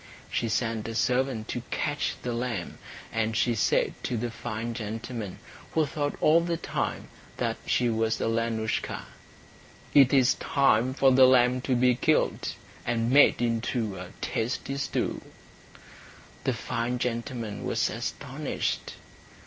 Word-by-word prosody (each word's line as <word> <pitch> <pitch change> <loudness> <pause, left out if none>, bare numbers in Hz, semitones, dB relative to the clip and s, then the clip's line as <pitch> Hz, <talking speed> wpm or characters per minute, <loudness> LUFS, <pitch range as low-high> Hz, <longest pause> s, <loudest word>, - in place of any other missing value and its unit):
She 115 - 0
sent 110 -1 -1
a 115 - -5
servant 125 -1 +1
to 120 - -2
catch 145 -1 -1
the 125 - -2
lamb; 115 -7 -3 0.3
and 110 0 0
she 120 - +2
said 110 - +2
to 125 - -2
the 120 +1 -2
fine 115 0 -4
gentleman, 115 -2 -5 0.4
who 160 -1 +3
thought 145 0 -2
all 160 +2 +5
the 170 0 -1
time - - -3 0.3
that - - -1
she 125 - +2
was 115 -1 0
Alenoushka, 115 -1 -1 0.9
"It 135 -3 +7
is 135 -1 +5
time 130 -2 +2
for 135 -1 +5
the 130 0 +7
lamb 125 0 +4
to 130 0 0
be 125 +1 +4
killed, 155 +6 +1 0.3
and 115 0 0
made 140 -3 +6
into 115 -2 -1
a - - -7
tasty 130 +4 -2
stew." 140 0 -2 1.2
The 130 - +2
fine 120 +1 -2
gentleman 120 -3 -3
was - - +1
astonished. - - -3
120 Hz, 135 wpm, -27 LUFS, 115-130 Hz, 1.2 s, It